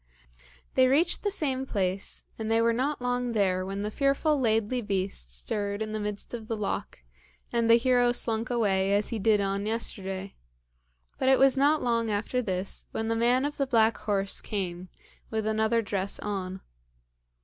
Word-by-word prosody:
They 260 0 +5
reached 310 +7 +2
the 410 - 0
same 265 -9 -2
place, 195 -3 -2 0.2
and 220 0 -3
they 225 0 +3
were 230 0 +3
not 260 +2 -1
long 245 -1 -1
there 185 -4 +1
when 195 +2 -4
the 210 - -3
fearful 280 +4 +1
Laidly 225 0 +1
Beast 190 - -2
stirred 200 - -2
in 215 0 -3
the 215 - -3
midst 210 +1 -3
of 225 -2 -6
the 225 - -2
loch, 200 - -4 0.5
and 230 -1 +1
the 230 - +9
hero 245 0 +3
slunk 230 -1 -1
away 200 -5 +1
as 205 0 +1
he 230 - -2
did 210 +1 +3
on 200 +1 -1
yesterday, 195 -4 -3 0.9
but 260 - +2
it 265 - +6
was 270 0 +5
not 290 +3 +3
long 230 -2 +1
after 215 +4 -1
this 190 -3 -3
when 225 0 -3
the 230 - +1
man 245 +4 +2
of 295 0 -4
the 275 - 0
black 225 -3 +3
horse 200 -2 -1
came, 185 -3 -4 0.4
with 220 -1 -2
another 220 +1 +1
dress 200 -1 -1
on. 190 -2 -4
220 Hz, 180 wpm, -28 LUFS, 200-245 Hz, 0.9 s, the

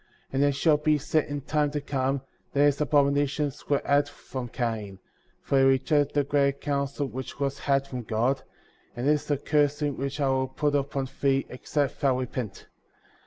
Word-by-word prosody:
*' - - -37
25. - - -26
And 135 +1 +2
it 145 0 +3
shall 155 +1 +4
be 150 0 +2
said 150 +2 +1
in 145 0 -4
time 150 +1 +1
to 145 +1 -2
come 135 -1 -1 0.2
— - - -41
That 145 +1 +4
these 145 0 +2
abominations 145 -1 +1
were 145 - +2
had 145 0 +3
from 130 -3 -7
Cain; 110 -5 -3 0.5
for 135 - +2
he - - +5
rejected 140 +2 +3
the 145 - +3
greater 140 0 +1
counsel 140 0 -2
which 130 0 -7
was 140 -1 -1
had 135 -1 +1
from 130 -2 -5
God; 120 +5 0 0.5
and 120 +3 -2
this 150 0 +2
is - - -17
a 145 - +2
cursing*^ 145 0 +1
which 140 +2 -3
I 140 - +2
will 130 0 +1
put 145 +2 -1
upon 140 -1 -1
thee, 135 -1 +2
except 140 +2 -2
thou 135 -3 +3
repent. 125 -4 -4
140 Hz, 200 wpm, -27 LUFS, 130-145 Hz, 0.5 s, he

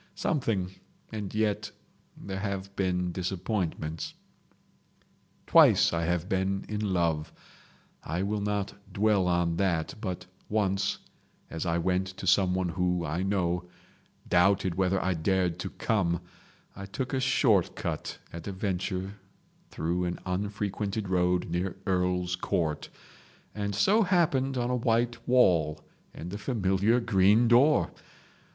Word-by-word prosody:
Something—and 105 - -3
yet 110 -1 0 0.5
there 95 -1 -5
have 100 -1 -4
been 90 -2 0
disappointments..... 90 -3 -3 1.3
"Twice - - +6
I 85 0 0
have 90 0 0
been 95 +1 -1
in 105 -1 -3
love—I 85 +1 -4
will 105 +1 -1
not 100 -1 -1 0.2
dwell 100 -2 +2
on 85 -1 +1
that—but 90 +1 -2 0.2
once, 100 -2 +1 0.5
as 80 +2 -3
I 85 0 +1
went 90 +2 0
to - - -6
someone 95 -1 +3
who, 90 0 0
I 80 +4 -2
know, 90 -2 0 0.6
doubted 95 +1 +3
whether 95 +1 +1
I 95 0 0
dared 90 +1 0
to - - -3
come, 85 -6 0 0.5
I 95 - -7
took 130 +7 -4
a 135 - +1
short 115 - +3
cut - - -4 0.2
at 85 +2 -7
a - - -2
venture 95 0 -2 0.6
through 85 +3 -1
an 90 0 -2
unfrequented 100 +1 -2
road 90 -1 +2
near 90 +2 -2
Earl's 90 -2 +1
Court, 85 -4 -2 0.6
and 100 -1 -3
so 205 - +4
happened 150 -9 +2
on 120 0 0
a - - +2
white 120 0 0
wall 85 -12 +4 0.3
and 90 +4 -8
a 100 - -4
familiar 105 -1 +2
green 110 0 +4
door. 130 +6 +4
95 Hz, 125 wpm, -28 LUFS, 90-105 Hz, 1.3 s, Twice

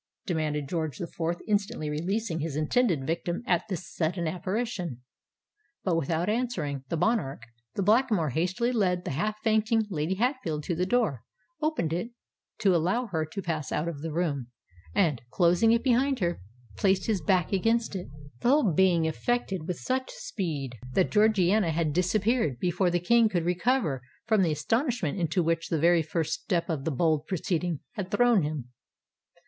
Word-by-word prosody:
demanded 155 -5 -1
George 160 -4 -2
the - - -3
Fourth, 170 0 -3
instantly 205 -5 0
releasing 170 +4 -2
his 155 -2 -3
intended 155 - +1
victim 170 - -2
at 175 -1 +1
this 185 -1 -4
sudden 170 +1 -1
apparition. 180 - -3 0.8
But, 180 -3 +1
without 165 +2 0
answering 210 - -1
the 165 - -1
monarch, 175 - 0 0.3
the 200 - 0
Blackamoor 215 - +3
hastily 185 - 0
led 180 -6 +1
the - - -2
half 210 +10 -1
fainting 220 0 +2
Lady 160 +2 -1
Hatfield 225 - -1
to 175 - -2
the 180 +2 0
door—opened 230 - -2
it 180 +7 -2 0.5
to 190 -3 +4
allow 185 +10 +1
her 160 -3 -1
to 195 +5 -5
pass 155 -4 -3
out 155 +3 -1
of 155 -4 -5
the 165 0 -4
room—and, 140 - -2
closing 180 - +4
it 230 0 +3
behind 265 +2 +3
her, 175 - -1 0.4
placed 190 -1 +2
his 210 -5 0
back 180 +2 +1
against 225 +3 +1
it,—the 145 - -5
whole 260 - +4
being 175 -1 +4
effected 190 0 -1
with 180 -2 -2
such 260 0 -2
speed, 140 - -4
that 185 - +2
Georgiana 210 -3 +3
had 160 -2 0
disappeared 185 - +1
before 180 +5 +1
the 175 0 +1
King 230 +5 +4
could 175 -5 -1
recover 180 - +1 0.2
from 220 -3 +3
the 170 -4 +2
astonishment 200 - 0
into 175 +1 +1
which 165 0 0
the 165 - +1
very 170 +2 +4
first 160 0 -2
step 175 -4 -1
of 145 -4 -3
the 160 - 0
bold 155 +1 +1
proceeding 175 -3 -1
had 190 -3 -5
thrown 240 -3 +4
him. 145 -5 -3
175 Hz, 165 wpm, -28 LUFS, 155-215 Hz, 0.8 s, to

